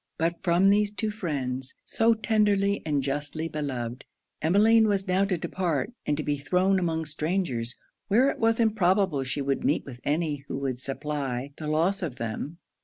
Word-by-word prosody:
But 165 +1 -1
from 180 +2 +4
these 205 0 +3
two 215 +1 -2
friends, 135 -9 -3
so 225 0 +3
tenderly 205 -2 +2
and 145 -3 +1
justly 145 +3 -2
beloved, 130 -6 -4 0.4
Emmeline 215 +7 +5
was 200 -1 0
now 185 +2 +3
to 190 -2 0
depart, 170 - -2
and 145 - +1
to 155 - -2
be 145 -1 -1
thrown 185 +7 +2
among 160 -2 -1
strangers, 150 -6 -1 0.3
where 230 +6 +4
it - - -8
was 225 0 +2
improbable 190 -8 +2
she 135 +2 -3
would 135 0 -1
meet 145 - +1
with 125 -3 -9
any 150 0 0
who - - -4
would 135 -3 -2
supply 135 -1 -3
the 155 - -5
loss 170 +6 +1
of 155 -8 -3
them. 120 +8 -4
160 Hz, 175 wpm, -27 LUFS, 140-195 Hz, 0.4 s, Emmeline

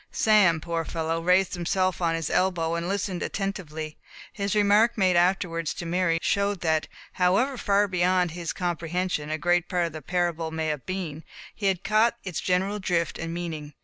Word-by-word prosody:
Sam, 205 -7 +4
poor 165 0 -2
fellow, 165 0 -2
raised 180 +2 +3
himself 185 +1 0
on 165 -1 +1
his 165 -3 -3
elbow, 175 -3 +1
and 170 +1 -2
listened 195 -2 -2
attentively; 160 -6 -4 0.4
his 200 0 -2
remark 210 +3 +4
made 185 -3 +3
afterwards 175 -2 +1
to 175 - -6
Mary, 170 -1 +1
showed 200 -1 0
that, 160 -2 +1 0.3
however 195 +10 +2
far 205 -3 +2
beyond 180 -1 +1
his 170 0 -4
comprehension 175 -2 -2
a 155 - -1
great 175 +2 +1
part 180 -2 +1
of 165 - -5
the 155 - -7
parable 175 -2 -1
may 160 0 -2
have 150 -3 -4
been, 170 -5 -4 0.3
he 205 - -2
had 190 -1 0
caught 220 +2 +3
its 180 -4 -4
general 190 +3 0
drift 175 -3 -1
and 165 0 -4
meaning. 160 -4 -5
175 Hz, 180 wpm, -26 LUFS, 165-195 Hz, 0.4 s, Sam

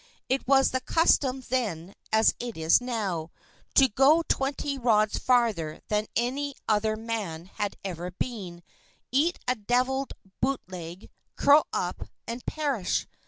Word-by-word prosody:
It 265 0 0
was 270 0 +4
the 260 - -1
custom 270 -3 +2
then 200 -8 -2 0.2
as 220 0 +4
it 240 -5 -5
is 160 +7 +4
now, 200 -10 -3 0.5
to 270 - +7
go 275 +8 +4
twenty 275 +1 -1
rods 215 -3 +2
farther 225 -11 +1
than 210 0 0
any 270 +4 -1
other 215 0 +2
man 215 -7 -4
had 205 +2 -4
ever 180 -1 -4
been, 180 -3 -6 0.5
eat 305 +7 +2
a 250 - +3
deviled 255 +4 0 0.3
bootleg, 185 -9 -4 0.2
curl 290 +2 +5
up, - - -3 0.2
and 235 +1 -6
perish. 280 -11 -1
235 Hz, 130 wpm, -27 LUFS, 195-265 Hz, 0.5 s, to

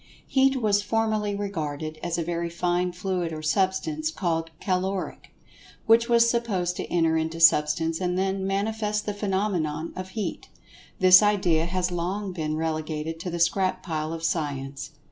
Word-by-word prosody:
Heat 270 0 +2
was 205 -3 +2
formerly 215 -1 0
regarded 155 -6 -4
as 170 -1 -2
a 170 - -1
very 170 0 -2
fine 175 +1 0
fluid 180 -1 -2
or 155 -1 -6
substance, 195 - 0
called 165 - -2
"caloric," 190 0 -2 0.6
which 230 +1 +4
was 235 0 +5
supposed 205 -7 0
to - - -5
enter 165 -2 +2
into 160 +1 -2
Substance 160 +1 +4
and 180 0 0
then 190 0 -1
manifest 210 +1 -1
the 210 - -2
phenomenon 190 -6 -2
of 185 0 -6
"heat." 215 - -4 0.5
This 185 +1 +8
idea 185 -6 +2
has 180 0 -1
long 185 +4 -2
since 180 - -8
been 155 -1 -2
relegated 160 0 -3
to 180 - -4
the 170 - -3
scrap 185 +2 +1
pile 155 -3 -3
of 165 0 -6
Science. 140 -4 -2
180 Hz, 160 wpm, -26 LUFS, 165-205 Hz, 0.6 s, This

